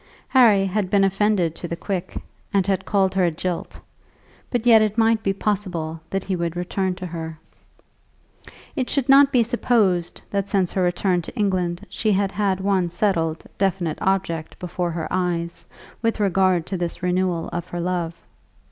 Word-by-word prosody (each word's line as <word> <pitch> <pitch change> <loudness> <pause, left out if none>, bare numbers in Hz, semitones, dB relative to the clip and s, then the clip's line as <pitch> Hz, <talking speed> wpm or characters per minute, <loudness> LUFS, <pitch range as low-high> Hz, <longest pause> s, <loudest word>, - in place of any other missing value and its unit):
Harry 220 -7 +5
had 195 0 -1
been 200 0 +3
offended 195 -3 +2
to 175 - -7
the 170 - -3
quick, 185 0 -4 0.3
and 195 -3 +2
had 195 -1 0
called 195 -2 +2
her 190 -1 +2
a - - +3
jilt; 175 +2 -4 0.7
but 245 -2 -1
yet 225 -2 +7
it 215 0 0
might 225 -1 +3
be 195 - +1
possible 185 -6 -2
that 195 -1 -2
he 190 - -2
would 170 -1 -2
return 180 +1 -1
to 185 - -7
her. 160 -2 -6 1.4
It 260 -4 -1
should 275 -3 0
not 275 0 +7
be 250 -4 +4
supposed 215 -7 +1
that 200 0 -1
since 190 -3 +1
her 190 - -1
return 180 0 +1
to 165 - -10
England 185 -2 0
she 220 - -1
had 195 0 +1
had 195 -2 0
one 190 -2 +1
settled, 165 -4 0 0.2
definite 185 -5 0
object 175 -4 -1
before 180 0 -3
her 165 -1 -3
eyes 175 -2 -2 0.3
with 230 -1 0
regard 185 -3 +2
to 190 - -3
this 175 0 -4
renewal 180 -2 0
of 175 0 -3
her 175 - -5
love. 170 -1 -2
185 Hz, 175 wpm, -22 LUFS, 175-205 Hz, 1.4 s, yet